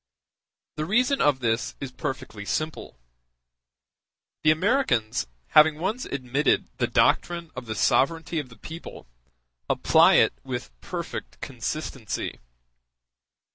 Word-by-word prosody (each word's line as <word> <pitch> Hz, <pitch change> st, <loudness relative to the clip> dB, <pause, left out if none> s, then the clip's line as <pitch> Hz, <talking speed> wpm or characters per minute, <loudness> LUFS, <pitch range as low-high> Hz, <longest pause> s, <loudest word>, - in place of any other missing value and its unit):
The 155 Hz, -, -1 dB
reason 250 Hz, -, +2 dB
of 145 Hz, -3 st, +3 dB
this 115 Hz, 0 st, 0 dB
is 135 Hz, -2 st, -5 dB
perfectly 110 Hz, -5 st, -5 dB
simple: 155 Hz, -, -3 dB, 1.4 s
the 155 Hz, -, +4 dB
Americans, 155 Hz, -, +1 dB, 0.2 s
having 155 Hz, 0 st, +6 dB
once 200 Hz, +9 st, -2 dB
admitted 135 Hz, +2 st, 0 dB
the -, -, +1 dB
doctrine 170 Hz, -2 st, +1 dB
of 125 Hz, -1 st, -7 dB
the 110 Hz, -, -3 dB
sovereignty 165 Hz, +8 st, +2 dB
of 140 Hz, -4 st, -6 dB
the 115 Hz, -, -15 dB
people, 165 Hz, +2 st, -9 dB, 0.6 s
apply -, -, +5 dB
it -, -, +5 dB
with -, -, -5 dB
perfect -, -, -6 dB
consistency. -, -, -4 dB
150 Hz, 110 wpm, -26 LUFS, 125-170 Hz, 1.4 s, having